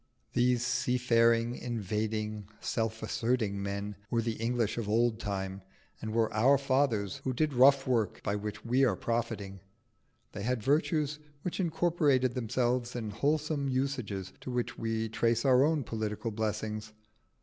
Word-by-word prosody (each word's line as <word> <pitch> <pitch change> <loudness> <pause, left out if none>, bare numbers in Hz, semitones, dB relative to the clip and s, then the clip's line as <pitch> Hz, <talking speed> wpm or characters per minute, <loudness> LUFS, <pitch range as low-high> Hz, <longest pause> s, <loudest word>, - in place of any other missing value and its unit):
These 120 -1 +2
seafaring, 115 -1 +2
invading, 110 -2 -3
self 110 -1 -2
asserting 110 -2 0
men 100 +1 -3
were 115 -1 +1
the 115 0 -1
English 115 -1 0
of 105 -3 -3
old 115 +1 +2
time, 95 -2 -3 0.4
and 110 - -4
were 115 0 +1
our 130 +6 +5
fathers 130 -7 +1
who 130 - -3
did 150 +4 0
rough 135 +2 +6
work 115 -5 0
by 100 - 0
which 105 +1 -5
we 125 +3 +3
are 120 -7 +3
profiting. 110 -3 -3 0.7
They 100 - -6
had 120 0 -1
virtues 150 +1 +1 0.2
which 180 - -3
incorporated 160 -7 +2
themselves 125 0 0
in 110 -3 -3
wholesome 145 +4 0
usages 125 -8 -2
to - - -7
which 125 -1 -2
we 115 0 -2
trace 115 +2 +1
our 130 0 +6
own 155 -1 +2
political 110 0 -3
blessings. 110 0 -3
115 Hz, 145 wpm, -31 LUFS, 110-130 Hz, 0.7 s, rough